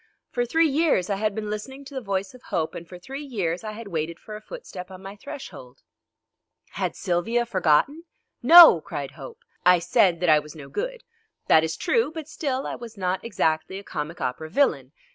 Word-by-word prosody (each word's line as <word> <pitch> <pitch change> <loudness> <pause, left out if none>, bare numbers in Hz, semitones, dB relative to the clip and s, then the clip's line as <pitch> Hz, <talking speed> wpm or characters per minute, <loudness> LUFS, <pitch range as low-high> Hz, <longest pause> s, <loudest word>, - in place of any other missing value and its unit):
For 245 0 -1
three 325 +6 +3
years 280 - +1
I 195 - 0
had 215 0 -1
been 210 -1 -4
listening 265 +6 -6
to 275 - -11
the 265 - -4
voice 195 -3 -3
of 255 - -15
Hope, 160 -1 -2
and 170 -1 -9
for 180 - -9
three 270 +11 -8
years 190 - -2
I 215 -1 -5
had 220 -1 -9
waited 165 -1 -3
for 215 - -9
a 210 - -9
footstep 195 - -9
on 190 0 -11
my 195 +1 -8
threshold. 200 - -10 0.9
Had - - -3
Sylvia 205 +7 0
forgotten? 225 - +2 0.4
"No!" 335 +7 +10
cried - - -5
Hope. 475 0 -11 0.2
I 180 0 +6
said 175 0 +2
that 180 - +2
I 155 -1 +6
was 150 +1 -11
no 140 -3 -10
good. - - -4 0.4
That 160 - +5
is 160 0 -2
true, 455 +3 +1
but 320 -2 -7
still 275 -4 -3
I - - -3
was 230 -2 -9
not 185 -1 -1
exactly 190 -4 -1
a 200 - -8
comic 165 -2 -5
opera 155 +5 -3
villain. 155 - +1
200 Hz, 200 wpm, -25 LUFS, 170-270 Hz, 0.9 s, No